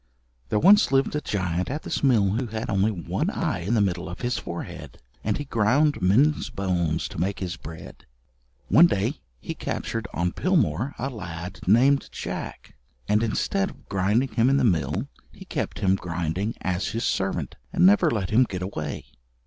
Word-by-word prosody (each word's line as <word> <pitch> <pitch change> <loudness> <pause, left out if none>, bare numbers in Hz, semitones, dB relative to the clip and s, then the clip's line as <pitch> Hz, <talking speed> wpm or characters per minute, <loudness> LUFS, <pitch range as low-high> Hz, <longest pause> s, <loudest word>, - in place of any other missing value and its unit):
There - - +1
once 205 - +6
lived 135 +2 +2
a 150 - 0
giant 90 - -2
at 150 +4 -4
this - - -3
mill 110 -8 +4
who 120 +4 -1
had 110 0 -4
only 100 +2 +2
one 95 -6 -2
eye - - -1
in 100 +8 -1
the 110 - +3
middle 90 -3 -1
of 90 - -8
his 125 0 0
forehead, 85 - -7 0.3
and 105 0 0
he 145 - -5
ground 135 +5 +2
men's 130 +12 +3
bones 90 -5 -1
to - - -7
make 95 +3 -1
his 90 -2 -4
bread. 80 +1 -11 0.6
One 170 +4 +7
day 105 - -1 0.2
he - - -5
captured 115 -3 -4
on 85 +1 -1
Pilmoor 155 - 0
a 135 +3 -3
lad 90 -6 -7
named 130 +7 +4
Jack, - - -6 0.3
and 105 +1 +3
instead 195 - 0
of - - -16
grinding 105 +7 +1
him 115 +2 +2
in 135 - +3
the 140 - +2
mill 90 -9 +1 0.2
he - - -13
kept - - -3
him 95 -1 +3
grinding 90 +4 -3
as 90 0 -1
his 115 +2 -3
servant, 95 -7 -1 0.2
and 85 - +3
never 100 +2 +6
let 100 -6 -2
him 125 +4 +5
get 95 -4 -5
away. 80 -6 -5
105 Hz, 180 wpm, -25 LUFS, 90-125 Hz, 0.6 s, One